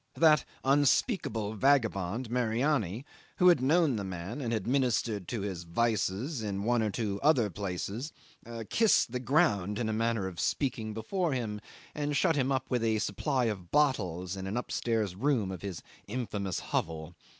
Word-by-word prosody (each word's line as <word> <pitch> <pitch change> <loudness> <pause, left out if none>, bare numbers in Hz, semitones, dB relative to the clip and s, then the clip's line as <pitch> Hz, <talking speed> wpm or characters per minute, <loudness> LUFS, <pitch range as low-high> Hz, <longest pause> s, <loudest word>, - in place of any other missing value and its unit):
That 155 -4 +5 0.2
unspeakable 135 - +2
vagabond, 115 -3 +1
Mariani, 120 - 0 0.3
who 180 - +6
had 170 -7 +4
known 150 -1 +3
the 100 - -3
man 95 +8 -5
and 120 -3 -2
had 110 -4 -1
ministered 120 -6 0
to 115 - -3
his 95 -3 -4
vices 110 - -1
in 100 -2 -3
one 120 +1 +2
or 110 - +1
two 100 -1 -2
other 130 -9 +3
places, 100 - -4 0.6
kissed 225 - +4
the 125 - -2
ground, 110 - +2
in 115 - -1
a - - 0
manner 115 -2 0
of 90 -3 -7
speaking, 115 -6 -1
before 165 - -1
him, 110 -5 -3 0.3
and 145 -1 -1
shut 165 - +3
him 135 -1 +1
up 130 -1 0
with 125 -2 0
a 110 -1 +2
supply 125 +6 0
of 95 -6 -3
bottles 95 - +1
in 95 0 -5
an 105 +5 -2
upstairs 110 -5 -1
room 115 -4 +1
of 95 -3 -6
his 95 -5 -6 0.2
infamous 105 -5 -3
hovel. 80 +1 -3
115 Hz, 165 wpm, -30 LUFS, 100-135 Hz, 0.6 s, who